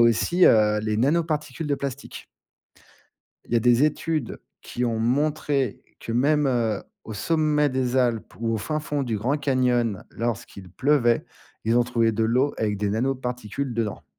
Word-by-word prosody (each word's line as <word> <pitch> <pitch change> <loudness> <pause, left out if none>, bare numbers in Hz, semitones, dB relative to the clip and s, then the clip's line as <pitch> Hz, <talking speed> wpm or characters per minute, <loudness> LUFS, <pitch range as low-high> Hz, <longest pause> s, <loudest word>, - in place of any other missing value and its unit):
aussi, 115 - +4
heu, 105 -1 +4
les 110 0 -1
nanoparticules 155 +3 0
de 145 - +1
plastique. 140 0 -6 1.2
Il - - -10
y 120 - +4
a - - +3
des 125 +3 +4
études 155 -2 -1 0.2
qui 125 - -3
ont 115 -1 -1
montré 140 0 0 0.2
que 115 - -5
même, 145 +4 +2
heu, 115 -5 0 0.2
au 110 - -7
sommet 150 +5 +1
des 130 -1 -1
Alpes 120 -4 0
ou 115 -1 0
au - - 0
fin 155 +9 -2
fond 145 -1 -2
du 115 -5 -2
Grand 130 +8 0
Canyon 125 -6 +1
lorsqu'il 105 -5 -5
pleuvait. 125 - +2 0.4
Ils 115 +2 +2
ont - - +5
trouvé 115 -2 +1
de 110 +1 0
l'eau 130 +5 +1
avec 105 -2 -1
des 105 0 0
nanoparticules 125 +1 -2
dedans. 110 -3 -3
125 Hz, 165 wpm, -24 LUFS, 115-145 Hz, 1.2 s, ont